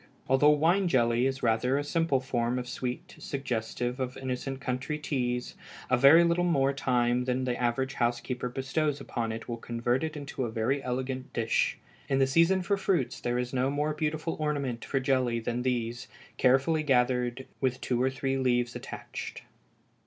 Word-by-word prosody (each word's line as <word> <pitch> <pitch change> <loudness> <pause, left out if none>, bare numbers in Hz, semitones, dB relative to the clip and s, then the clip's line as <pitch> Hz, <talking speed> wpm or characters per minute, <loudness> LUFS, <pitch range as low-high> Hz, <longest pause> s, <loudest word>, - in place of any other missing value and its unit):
Although 135 +3 +5
wine 165 +6 +3
jelly 120 -3 +3
is 135 0 -3
rather 125 +3 +2
a 145 - 0
simple 165 -2 +1
form 120 -1 -1
of 125 -1 -4
sweet, 125 0 -5
suggestive 125 -1 -3
of 130 -1 -3
innocent 130 +1 -4
country 130 +3 -2
teas, 125 -5 -2 0.4
a - - +6
very 140 +7 +7
little 170 +1 +2
more 140 -6 +2
time 125 -2 +1
than 130 0 0
the 125 -1 0
average 125 +3 0
housekeeper 120 0 -1
bestows 135 +3 -1
upon 115 -4 -3
it 115 +1 -6
will 120 - -3
convert 120 +3 -1
it 155 -1 -3
into 140 -2 -4
a 120 - -2
very 120 +5 0
elegant 130 +1 -3
dish. 115 -1 +1 0.3
In 135 - +2
the 135 - +4
season 170 +7 +3
for 200 +2 +1
fruits 185 -8 0
there 120 0 -1
is 125 +1 -2
no 130 +1 +1
more 150 +2 0
beautiful 155 +1 -2
ornament 140 -6 -2
for 135 - -1
jelly 130 -3 +1
than 120 +2 -2
these, 120 -2 -2 0.3
carefully 135 +5 +3
gathered, 125 -2 +1
with 130 -1 0
two 125 -1 -1
or 130 - +3
three 135 0 -2
leaves 120 -2 +1
attached. - - -7
130 Hz, 175 wpm, -29 LUFS, 125-140 Hz, 0.4 s, very